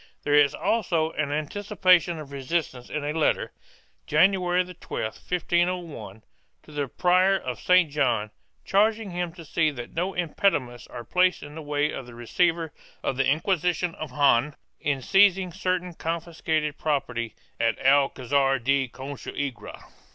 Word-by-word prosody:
There 145 Hz, -, 0 dB
is 145 Hz, 0 st, +5 dB
also 170 Hz, -8 st, 0 dB
an 150 Hz, -2 st, -2 dB
anticipa 185 Hz, +4 st, +2 dB
tion 170 Hz, +1 st, -5 dB
of 150 Hz, -3 st, -9 dB
resistance 135 Hz, -2 st, -3 dB
in 150 Hz, -, -3 dB
a 150 Hz, +1 st, -2 dB
letter, 160 Hz, -1 st, +1 dB, 0.6 s
Janary 180 Hz, +2 st, +3 dB, 0.2 s
12, -, -, -4 dB
1501, 175 Hz, -, -2 dB, 0.4 s
to -, -, -16 dB
the 145 Hz, -2 st, -2 dB
Prior 185 Hz, +6 st, +3 dB
of 125 Hz, -9 st, -5 dB
St. 180 Hz, -4 st, +4 dB
John, 120 Hz, -7 st, 0 dB, 0.3 s
charging 215 Hz, +1 st, +2 dB
him 175 Hz, -1 st, -3 dB
to 165 Hz, -, -11 dB
see 155 Hz, +1 st, +1 dB
that 120 Hz, -5 st, -8 dB
no 180 Hz, +3 st, -2 dB
impediments 145 Hz, -, 0 dB
are 120 Hz, -1 st, -8 dB
placed 180 Hz, +9 st, +2 dB
in 145 Hz, 0 st, -10 dB
the 160 Hz, -, -7 dB
way 145 Hz, 0 st, 0 dB
of 130 Hz, -, -7 dB
the 120 Hz, -, -12 dB
receiver 165 Hz, +6 st, 0 dB, 0.3 s
of -, -, -1 dB
the 135 Hz, +1 st, +1 dB
Inquisition 175 Hz, +3 st, +1 dB
of 155 Hz, -2 st, -7 dB
Jaen 145 Hz, 0 st, +3 dB, 0.2 s
in 140 Hz, -4 st, -1 dB
seizing 190 Hz, 0 st, +4 dB
certain 185 Hz, -1 st, -2 dB
confiscated 160 Hz, -2 st, -2 dB
property 125 Hz, -6 st, -2 dB, 0.2 s
at 115 Hz, 0 st, +1 dB
Alcazar 135 Hz, 0 st, +3 dB
de 135 Hz, +2 st, +1 dB
Consuegra. 135 Hz, 0 st, -6 dB
155 Hz, 145 wpm, -26 LUFS, 135-180 Hz, 0.6 s, is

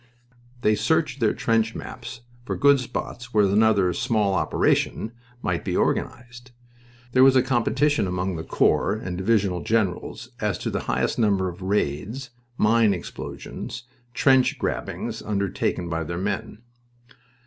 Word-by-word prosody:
They 105 Hz, -, +3 dB
searched 155 Hz, +2 st, +1 dB
their 115 Hz, -3 st, +2 dB
trench 115 Hz, -1 st, +1 dB
maps 125 Hz, -1 st, -8 dB, 0.2 s
for -, -, -3 dB
good 140 Hz, -1 st, +5 dB
spots 125 Hz, -1 st, -6 dB
where 105 Hz, -1 st, +5 dB
another 100 Hz, -2 st, +3 dB
"small 105 Hz, -1 st, +1 dB
operation" 110 Hz, +3 st, +1 dB, 0.3 s
might -, -, -1 dB
be -, -, -1 dB
organized. 120 Hz, +1 st, -2 dB, 0.6 s
There 130 Hz, +2 st, +5 dB
was 135 Hz, 0 st, +6 dB
a 130 Hz, -, +5 dB
competition 135 Hz, +1 st, +1 dB
among 90 Hz, 0 st, -2 dB
the 80 Hz, -, -5 dB
corps 100 Hz, -, +2 dB
and 90 Hz, -5 st, -4 dB
divisional 95 Hz, -2 st, +1 dB
generals 110 Hz, -4 st, -1 dB
as -, -, -1 dB
to -, -, -3 dB
the -, -, -1 dB
highest -, -, 0 dB
number 100 Hz, -4 st, +2 dB
of 90 Hz, +2 st, -10 dB
raids, 105 Hz, -, -2 dB, 0.3 s
mine 110 Hz, -2 st, +4 dB
explosions, 100 Hz, +5 st, -7 dB, 0.3 s
trench 130 Hz, -1 st, +4 dB
grabbings -, -, -3 dB
undertaken 100 Hz, -3 st, -1 dB
by 80 Hz, -1 st, -2 dB
their 85 Hz, +2 st, -5 dB
men. 105 Hz, +4 st, -4 dB
110 Hz, 135 wpm, -24 LUFS, 95-125 Hz, 0.6 s, was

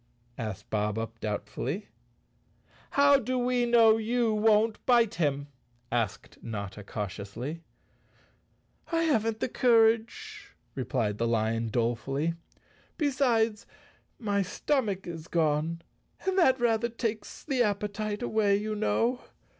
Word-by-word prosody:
asked 110 Hz, -5 st, -5 dB
Bob 105 Hz, 0 st, 0 dB
Up 115 Hz, 0 st, -5 dB
doubtfully. 110 Hz, -, -3 dB, 1.0 s
"How 280 Hz, 0 st, +5 dB
do 255 Hz, +1 st, -2 dB
we 245 Hz, 0 st, +1 dB
know 225 Hz, -2 st, +6 dB
you 230 Hz, 0 st, +1 dB
won't 215 Hz, 0 st, +3 dB
bite 235 Hz, -3 st, +4 dB
him?" 145 Hz, -5 st, 0 dB, 0.5 s
asked 115 Hz, -4 st, -2 dB
Notta 105 Hz, -2 st, -6 dB
cautiously. 105 Hz, -, -5 dB, 1.3 s
"I 330 Hz, 0 st, +2 dB
haven't 225 Hz, -8 st, +1 dB
the -, -, +1 dB
courage," 250 Hz, -, +1 dB, 0.2 s
replied 115 Hz, -5 st, -2 dB
the 115 Hz, -, +1 dB
lion 115 Hz, 0 st, 0 dB
dolefully. 120 Hz, +7 st, -1 dB, 0.6 s
"Besides 245 Hz, -7 st, +1 dB, 0.5 s
my 205 Hz, -3 st, 0 dB
stomach 200 Hz, 0 st, -1 dB
is 165 Hz, -2 st, -7 dB
gone 160 Hz, +1 st, 0 dB, 0.4 s
and 380 Hz, -1 st, +1 dB
that 265 Hz, -9 st, +4 dB
rather 235 Hz, -1 st, +2 dB
takes 225 Hz, -2 st, -4 dB
the 265 Hz, -4 st, 0 dB
appetite 210 Hz, 0 st, -1 dB
away, 215 Hz, -4 st, +2 dB
you 215 Hz, +1 st, -3 dB
know. 230 Hz, +3 st, 0 dB
210 Hz, 115 wpm, -28 LUFS, -, 1.3 s, know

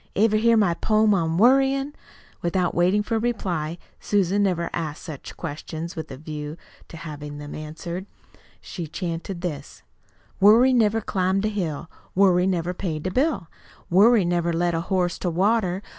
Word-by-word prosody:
Ever 215 Hz, +1 st, +3 dB
hear 230 Hz, +1 st, +4 dB
my 200 Hz, -5 st, +3 dB
poem 215 Hz, +4 st, +2 dB
on 165 Hz, -3 st, 0 dB
worryin'?" 270 Hz, +5 st, +3 dB, 0.5 s
Without 175 Hz, 0 st, 0 dB
waiting 185 Hz, +4 st, +2 dB
for 225 Hz, +2 st, -1 dB
a -, -, 0 dB
reply 175 Hz, -9 st, -2 dB, 0.2 s
Susan 200 Hz, 0 st, +1 dB
never 180 Hz, -4 st, +1 dB
asked 155 Hz, -3 st, -4 dB
such 155 Hz, -6 st, -9 dB
questions 160 Hz, +2 st, -6 dB
with 160 Hz, -2 st, -6 dB
a 130 Hz, -, -8 dB
view 150 Hz, +1 st, -6 dB, 0.3 s
to 165 Hz, -, -10 dB
having 150 Hz, -2 st, -7 dB
them 145 Hz, 0 st, -8 dB
answered 170 Hz, +5 st, -6 dB, 0.5 s
she 170 Hz, -4 st, -7 dB
chanted 170 Hz, +2 st, -5 dB
this: 140 Hz, -, -6 dB, 0.6 s
"Worry 230 Hz, +6 st, +6 dB
never 225 Hz, -2 st, +3 dB
climbed 190 Hz, 0 st, 0 dB
a -, -, +1 dB
hill, 170 Hz, -7 st, -3 dB, 0.3 s
Worry 185 Hz, -1 st, +4 dB
never 180 Hz, -1 st, -1 dB
paid 165 Hz, -4 st, -4 dB
a 185 Hz, -, -1 dB
bill, 255 Hz, -, 0 dB, 0.4 s
Worry 205 Hz, +2 st, +5 dB
never 175 Hz, 0 st, 0 dB
led 170 Hz, +1 st, 0 dB
a 165 Hz, -, 0 dB
horse 180 Hz, 0 st, -1 dB
to 180 Hz, -, -1 dB
water. 190 Hz, +1 st, +1 dB
180 Hz, 160 wpm, -24 LUFS, 165-205 Hz, 0.6 s, Worry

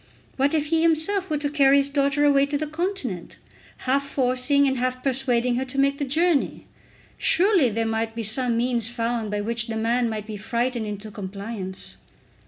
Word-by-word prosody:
What 280 Hz, +3 st, +1 dB
if 300 Hz, -1 st, +1 dB
he 325 Hz, -, +3 dB
himself 335 Hz, +4 st, +2 dB
were 305 Hz, -, 0 dB
to 290 Hz, 0 st, -1 dB
carry 280 Hz, -2 st, +5 dB
his 280 Hz, 0 st, +2 dB
daughter 280 Hz, 0 st, +2 dB
away 280 Hz, -1 st, +4 dB
to 285 Hz, 0 st, -1 dB
the 310 Hz, -, -2 dB
continent, 360 Hz, +6 st, -4 dB, 0.5 s
half 275 Hz, +2 st, +2 dB
forcing 260 Hz, +2 st, +2 dB
and 265 Hz, -2 st, 0 dB
half 255 Hz, 0 st, -2 dB
persuading 250 Hz, -2 st, +1 dB
her 260 Hz, -, -1 dB
to 265 Hz, +1 st, -7 dB
make 275 Hz, 0 st, +2 dB
the 285 Hz, -, -1 dB
journey! 315 Hz, +2 st, 0 dB, 0.5 s
Surely 365 Hz, -, +3 dB
there 225 Hz, +1 st, -1 dB
might 225 Hz, 0 st, -2 dB
be 230 Hz, -, -3 dB
some 235 Hz, +2 st, +1 dB
means 235 Hz, -2 st, +1 dB
found 230 Hz, -2 st, -2 dB
by 205 Hz, 0 st, -2 dB
which 230 Hz, +1 st, -1 dB
the 225 Hz, -1 st, -3 dB
man 235 Hz, +2 st, +1 dB
might 215 Hz, -2 st, -4 dB
be 215 Hz, -1 st, -6 dB
frightened 235 Hz, +2 st, -2 dB
into 210 Hz, +1 st, -6 dB
compliance. 195 Hz, -1 st, -7 dB
255 Hz, 190 wpm, -24 LUFS, 225-285 Hz, 0.5 s, carry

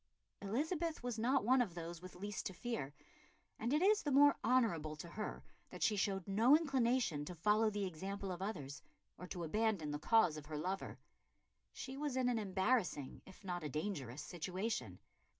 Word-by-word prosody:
Elizabeth 310 Hz, -, -1 dB
was 245 Hz, -3 st, -2 dB
not 255 Hz, +1 st, +2 dB
one 255 Hz, +2 st, +5 dB
of 195 Hz, -8 st, -2 dB
those 170 Hz, 0 st, -6 dB
with 185 Hz, 0 st, -10 dB
least 205 Hz, +2 st, -4 dB
to 190 Hz, -, -6 dB
fear, 150 Hz, -, -4 dB, 0.6 s
and 235 Hz, +3 st, -1 dB
it 300 Hz, +4 st, +3 dB
is 420 Hz, +2 st, +5 dB
the 295 Hz, -, -2 dB
more 285 Hz, +1 st, +7 dB
honourable 170 Hz, -12 st, +2 dB
to 160 Hz, +3 st, -8 dB
her 210 Hz, +4 st, -5 dB, 0.3 s
that -, -, -5 dB
she 215 Hz, -, +3 dB
showed 195 Hz, -2 st, 0 dB
no 225 Hz, +9 st, +6 dB
inclination 255 Hz, -, +1 dB
to 175 Hz, +4 st, -7 dB
follow 210 Hz, +6 st, +3 dB
the 205 Hz, -1 st, -2 dB
example 190 Hz, +3 st, -4 dB
of 180 Hz, 0 st, -5 dB
others, 150 Hz, -8 st, -4 dB, 0.4 s
or 180 Hz, -, -7 dB
to 175 Hz, -1 st, -5 dB
abandon 200 Hz, -3 st, 0 dB
the 145 Hz, -, -3 dB
cause 180 Hz, -3 st, +4 dB
of 150 Hz, -1 st, -9 dB
her 155 Hz, -1 st, -4 dB
lover. 185 Hz, +6 st, -3 dB, 0.7 s
She 265 Hz, +1 st, -7 dB
was 290 Hz, -3 st, -2 dB
in 255 Hz, -1 st, +2 dB
an 235 Hz, -2 st, +1 dB
embarrassing, 190 Hz, -, 0 dB
if 190 Hz, +1 st, -14 dB
not 175 Hz, -3 st, -3 dB
a 150 Hz, -, -3 dB
dangerous 150 Hz, -, -3 dB
situation. 185 Hz, +7 st, -3 dB
200 Hz, 185 wpm, -37 LUFS, 170-245 Hz, 0.7 s, more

